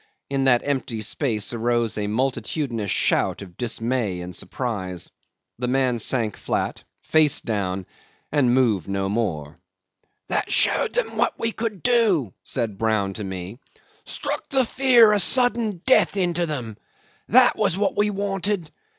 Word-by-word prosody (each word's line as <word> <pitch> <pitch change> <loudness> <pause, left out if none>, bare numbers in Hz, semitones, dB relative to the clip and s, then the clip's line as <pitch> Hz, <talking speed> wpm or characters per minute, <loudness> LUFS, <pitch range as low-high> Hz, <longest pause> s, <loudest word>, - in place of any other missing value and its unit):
In 135 -1 0
that 125 -2 +4
empty 130 -6 -2
space 110 -2 -2
arose 120 -1 0
a 105 -1 -2
multitudinous 125 -1 -2
shout - - +1
of 90 -3 -13
dismay 115 -4 -2
and 90 +1 -7
surprise. 95 -8 -4 0.5
The 125 - -1
man 125 -2 +1
sank 115 -2 0
flat, - - -3 0.2
face 155 -2 +3
down, 95 -4 -2 0.5
and 140 -5 +3
moved 120 -8 +2
no 95 0 -1
more. 85 -8 -3 0.7
"That - - -1
showed 485 - +3
them - - -2
what - - +1
we 230 - -1
could 220 -5 -4
do," 210 - +2
said 110 -6 -3
Brown 110 -3 0
to 105 - -6
me. 95 +4 -6 0.4
"Struck - - -4
the 265 -2 +2
fear 240 -4 +5
of 205 - +3
sudden 230 -6 +1
death 260 -5 +4
into 175 -2 0
them. 120 -8 -5 0.5
That 250 +2 +6
was 195 -4 +1
what 200 -1 0
we 210 0 +2
wanted. 200 -3 -2
125 Hz, 145 wpm, -23 LUFS, -, 0.7 s, That